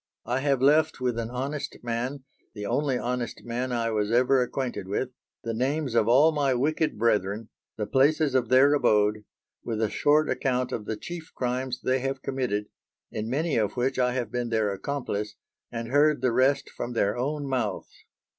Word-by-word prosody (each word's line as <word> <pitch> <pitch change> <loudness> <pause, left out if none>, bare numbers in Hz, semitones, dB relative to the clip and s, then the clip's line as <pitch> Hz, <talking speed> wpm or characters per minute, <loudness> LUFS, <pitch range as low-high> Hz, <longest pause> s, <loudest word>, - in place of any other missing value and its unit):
I 125 +2 0
have 135 -2 +1
left 155 +2 +4
with 125 -2 -1
an 115 -1 -3
honest 135 +4 -4
man 125 +4 -3 0.3
the 105 -1 -5
only 130 +3 0
honest 125 -1 -3
man 125 +2 -3
I 115 -1 0
was 105 -1 0
ever 125 +2 +4
acquainted 125 -5 -3
with 105 +6 -1 0.3
the 115 - -2
names 135 +3 -1
of 115 -2 +3
all 140 +7 +6
my 140 -4 +1
wicked 155 +2 0
brethren, 105 -1 0 0.3
the 105 - -1
places 145 +3 +3
of 130 -1 +1
their 135 +3 +6
abode, 105 -6 +2 0.4
with 110 -2 -3
a 110 -2 0
short 150 +1 +3
account 130 -2 0
of 110 -4 -4
the 110 - -3
chief 170 +3 -8
crimes 125 0 -2
they 130 +1 +1
have 135 +1 -3
committed, 125 -6 -1 0.5
in 110 +1 -4
many 150 +3 0
of 105 -2 +1
which 130 +2 0
I 125 -1 +2
have 120 -4 -3
been 120 -1 -2
their 110 -3 +1
accomplice, 105 -2 -3 0.4
and 115 -1 -5
heard 145 +1 +3
the 125 - +3
rest 130 +4 +2
from 120 - -5
their 105 -3 +1
own 145 +4 -2
mouths. 125 -7 -2
125 Hz, 185 wpm, -27 LUFS, 115-135 Hz, 0.5 s, all